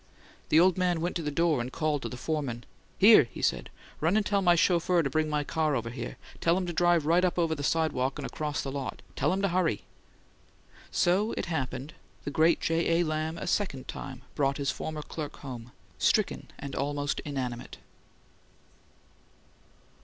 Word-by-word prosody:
The 155 - +6
old 185 +1 +4
man 180 -2 +2
went 175 +2 -2
to - - -3
the 150 - -2
door 155 -3 +2
and 125 +2 -5
called 155 -2 0
to - - -4
the 125 - -7
foreman. 135 -5 -3 0.3
"Here!" 205 - +8
he 115 - -9
said. - - 0 0.3
"Run 170 +7 +2
and 215 - +1
tell 200 0 +2
my 175 -2 +5
chauffeur 175 0 +3
to 135 - -2
bring 155 +1 +1
my 150 -1 0
car 155 0 0
over 115 -2 -2
here. 125 - -6 0.2
Tell 170 +1 +3
him 185 - -1
to 175 - -3
drive 175 -2 +3
right 170 +3 +4
up 180 -1 +1
over 165 -2 +2
the 145 - -4
sidewalk 145 -4 0
and - - -5
across 150 -1 -3
the 135 - -4
lot. 135 -2 -5
Tell 145 +3 +1
him 195 +2 -1
to 200 - +3
hurry!" 175 - +1 1.1
So, 195 +6 +2
it - - -1
happened, 135 -3 -3 0.3
the 145 - -4
great 160 +3 +4
J. 165 +1 +1
A. - - +4
Lamb 155 0 -2
a - - -5
second 140 -11 -1
time 130 -1 -7
brought 140 -2 +1
his 140 -2 0
former 155 -1 -5
clerk 150 -1 -6
home, 125 -3 -8 0.3
stricken - - +1
and 140 -1 -7
almost 145 0 -1
inanimate. 130 -4 -5
155 Hz, 190 wpm, -29 LUFS, 140-175 Hz, 1.1 s, Here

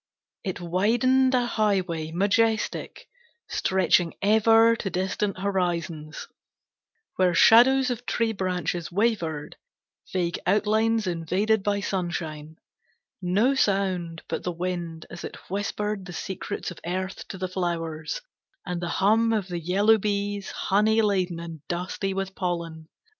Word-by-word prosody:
It 190 -4 -3
widened 240 +9 +2
a 245 -1 +2
highway, 190 -8 0
majestic, 220 +5 0 0.4
stretching 180 -2 +2
ever 225 +2 +5
to 195 - -3
distant 190 +2 -1
horizons, 175 -5 -2 0.9
Where 180 -2 +3
shadows 255 +7 +6
of 245 0 -5
tree 230 -1 0
branches 180 -3 -2
wavered, 170 -8 -1 0.5
vague 175 -2 -1
outlines 220 +3 +2
invaded 185 +5 +1
by 205 0 0
sunshine; 160 -5 -4 0.7
No 200 +9 +2
sound 190 -8 0
but - - -3
the 180 - -2
wind 170 -2 -4
as 170 - -8
it - - -6 0.2
whispered 205 0 -2
the 175 - -8
secrets 190 +2 -5
of 175 - -10
earth 185 +2 -4
to 190 - -7
the 185 0 -2
flowers, 170 - -3 0.4
And 180 -2 -3
the 175 - -3
hum 220 +5 +3
of 210 -4 -1
the 175 -1 -3
yellow 200 +6 +3
bees, 205 -1 -2
honey 220 +3 +2
laden 185 -5 0
and 165 -3 -8
dusty 185 +2 -3
with 195 0 -3
pollen. 170 -4 -4
190 Hz, 125 wpm, -26 LUFS, 175-210 Hz, 0.9 s, shadows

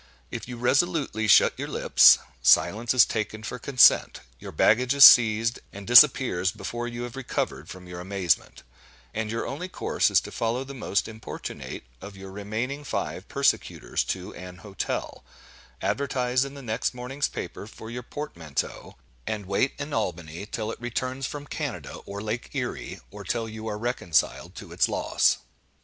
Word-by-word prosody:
If - - -6
you 125 -1 -7
resolutely 135 - +1
shut 105 - +6
your - - -3
lips, - - +6 0.2
silence 105 - +4
is 125 - +7
taken 110 0 -4
for 125 +2 -5
consent; 130 +1 +4 0.2
your - - -9
baggage 125 +5 +3
is 140 - +10
seized, 115 0 +6
and 100 0 -10
disappears 120 -7 +6
before 115 +4 -5
you 120 0 -5
have 120 0 -7
recovered 135 -2 -3
from 90 0 -10
your 90 0 -8
amazement; 90 -3 -1 0.5
and 110 -1 -3
your 115 +1 -3
only 180 +7 -5
course - - 0
is - - +4
to - - -10
follow 115 +3 -1
the 135 +1 -9
most 105 -6 -1
importunate 110 0 -8 0.2
of 100 0 -10
your 95 0 -10
remaining 110 +8 -4
five 140 - -4
persecutors - - 0
to 90 -1 -4
an 90 0 -10
hotel; 100 -1 -4 0.6
advertise 130 -2 0
in 140 +1 -9
the 140 - -10
next 115 +2 -2
morning's 130 +3 -2
paper 100 - -7
for 110 +1 -10
your 125 +1 -5
portmanteau; 85 - -6 0.3
and 105 -2 -3
wait 100 +8 0
in 145 +1 -6
Albany 90 -3 -3
till 110 0 -4
it - - -9
returns 130 +2 -3
from 145 -1 -7
Canada - - -5
or 100 +1 -6
Lake 110 +3 -4
Erie, - - -4
or - - -9
till 120 -1 -2
you 110 0 -8
are 105 - -3
reconciled 110 -8 -1
to - - -10
its - - +1
loss. - - +2
115 Hz, 165 wpm, -26 LUFS, 100-125 Hz, 0.6 s, is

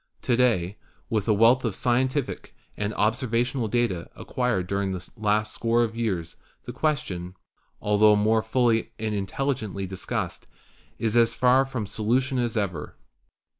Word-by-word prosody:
To 120 - +2
day, 105 -6 +2 0.3
with 110 -2 0
a 110 - +4
wealth 115 +5 +5
of 110 -6 -1
scientific 130 +4 -1 0.2
and 105 0 -2
observational 120 +2 0
data 105 -7 -1
acquired 125 -8 -1
during 100 0 -1
the 90 -2 -7
last 105 -1 0
score 115 +1 +2
of 115 -1 -3
years, 95 -8 -2 0.3
the - - -7
question, 95 - -2 0.5
altho 105 0 +5
more 110 +2 +3
fully 115 0 +1
and 110 -1 -2
intelligently 105 -1 -2
discussed, 95 0 -4 0.5
is 110 0 -1
as 115 -1 +4
far 130 +1 +4
from 130 -5 -4
solu 110 +5 +1
tion 130 0 -2
as 120 -2 -1
ever. 90 -8 -3
110 Hz, 145 wpm, -25 LUFS, 100-125 Hz, 0.5 s, wealth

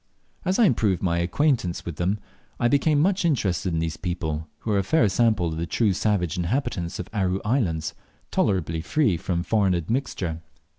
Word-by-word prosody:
As 185 +1 +1
I 235 - +6
improved 105 - +2
my 85 -2 +1
acquaintance 90 - 0
with 85 -3 -5
them 95 +4 0 0.4
I 120 - +3
became 145 +3 +3
much 190 +5 +2
interested 100 - +1
in 80 - -1
these 80 -1 -2
people, 80 -4 -3
who 110 - -2
are 100 - +3
a - - +1
fair 115 +3 +3
sample 110 -3 +2
of 80 - -4
the 85 +1 -2
true 105 +4 +2
savage 95 -3 0
inhabitants 90 -3 -1
of 90 - -4
the 110 - -6
Aru 95 0 +1
Islands, 95 - 0 0.4
tolerably 85 -5 0
free 130 - +2
from 85 +1 -2
foreign 100 -3 +2
admixture. 85 - -2
95 Hz, 185 wpm, -25 LUFS, 85-120 Hz, 0.4 s, I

